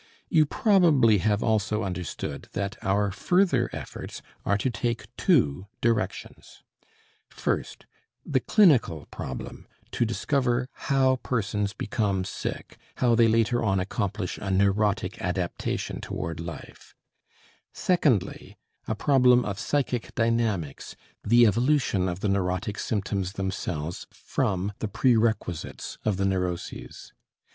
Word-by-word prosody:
You 155 -4 +4
probably 155 - +4
have 105 +2 +1
also 110 -1 +1
understood 90 -2 -5
that 100 +1 -2
our 100 +1 +1
further 140 - +2
efforts - - -7 0.2
are 100 - +2
to 125 +5 -1
take 120 +2 -3
two 95 - +2
directions: 115 -1 -2 0.7
first, - - -3 0.4
the 135 - +1
clinical 130 - +3
problem - - -7 0.2
to - - 0
discover 125 +2 0 0.2
how 130 -1 +4
persons 105 -5 -2
become 100 -3 -1
sick, 95 - -6 0.2
how 120 -2 +2
they 115 0 +5
later 115 +1 +2
on 95 -3 +2
accomplish 100 0 -3
a 95 - -4
neurotic 100 +2 +1
adaptation - - -2
toward 80 +1 -4
life; 85 -3 -9 0.8
secondly, 145 - 0 0.3
a 110 - -1
problem 125 0 +4
of 100 -1 -4
psychic 130 -5 -1
dynamics, 115 - -1 0.3
the 120 +3 +6
evolution 115 -4 +2
of 90 +1 -5
the - - 0
neurotic 100 +2 -1
symptoms 100 -3 -2
themselves 90 -5 -4
from 95 +2 -2
the 110 - -2
prerequisites 110 -6 0
of 105 -4 0
the 100 - 0
neuroses. 90 -2 -3
105 Hz, 115 wpm, -26 LUFS, 95-120 Hz, 0.8 s, the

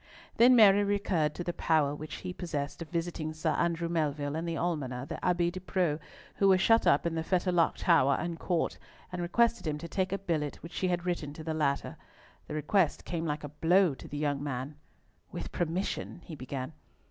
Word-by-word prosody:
Then 250 +2 +7
Mary 205 -3 +7
recurred 195 -7 0
to 175 - -4
the 175 - -3
power 155 -4 +2
which 150 +1 -7
he 180 - -3
possessed 155 -5 -4
of 165 - -6
visiting 165 -2 -3
Sir 155 - 0
Andrew 170 0 0
Melville 150 -3 -1
and 165 +1 -3
the 165 -1 -2
Almoner, 135 -7 -2
the - - -7
Abbe 175 -1 +2
de 185 - -6
Preaux, 175 -5 0 0.4
who 195 - +4
were 190 -1 +6
shut 225 +4 +4
up 145 - +4
in 170 - 0
the 165 - -1
Fetterlock 175 0 +2
tower 140 -6 +4
and 170 -1 -4
court, 175 -3 -1 0.3
and 180 -1 -4
requested 225 +2 +2
him 150 -1 -1
to 170 - -7
take 190 +1 -1
a 195 - 0
billet 160 -7 -2
which 165 - -9
she 185 - 0
had 175 -1 -1
written 165 -5 -2
to 155 - -9
the 160 0 -2
latter. 145 -3 -1 0.5
The 150 - -5
request 155 +3 +1
came 165 -1 -3
like 150 0 -2
a 145 - -5
blow 170 +3 +3
to - - -11
the 145 - -6
young 145 -2 -1
man. 135 0 -4 0.6
"With - - -6
permission—" 175 +1 -2
he 165 - -9
began. 130 0 -5
165 Hz, 205 wpm, -30 LUFS, 150-180 Hz, 0.6 s, Then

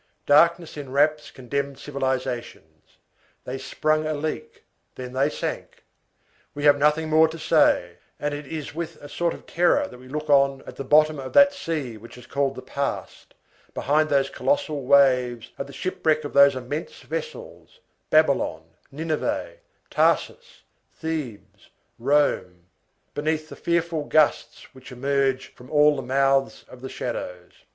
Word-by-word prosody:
Darkness 165 +3 +3
enwraps 145 +2 0
condemned 140 +2 -4
civilizations. 130 - -5 0.5
They 130 +1 -5
sprung 155 +4 0
a 155 - -1
leak, 450 - -5 0.3
then 125 -1 -7
they 135 +3 +2
sank. - - -6 0.7
We 145 - -5
have 145 -1 +5
nothing 150 +2 +2
more 160 +1 +5
to 160 +1 -8
say; 155 - +2 0.2
and 145 0 -2
it 145 -1 -6
is 155 -1 -6
with 170 +1 -5
a 145 - -12
sort 170 +3 -1
of - - -15
terror 175 +1 +2
that 125 - -13
we 130 - -14
look 150 +3 -5
on, 140 -2 +3
at - - -10
the - - -4
bottom 155 +2 +4
of 130 -1 -7
that 280 0 +7
sea 155 - -4
which 115 +3 -13
is 125 - -13
called 135 +1 -1
the 130 - -8
past, 140 0 -5 0.4
behind 155 +2 +1
those 135 -1 +2
colossal 165 - -1
waves, 125 -4 +3
at 140 - -4
the - - -11
shipwreck 155 -1 -1
of 145 - -6
those 140 -1 +6
immense 130 +5 -6
vessels, 485 +1 -7 0.3
Babylon, - - +2 0.3
Nineveh, 160 - -3 0.3
Tarsus, 485 0 0 0.3
Thebes, 155 -9 -6 0.3
Rome, 115 -10 +1 0.5
beneath 155 +1 -2
the - - -9
fearful 170 -2 -1
gusts 155 0 +1
which 130 0 -13
emerge 135 0 -1
from 125 - -15
all 150 -1 +4
the 135 - -4
mouths 135 +1 +1
of 125 - -13
the 130 - -6
shadows. 90 -9 -6
145 Hz, 150 wpm, -24 LUFS, 130-155 Hz, 0.7 s, that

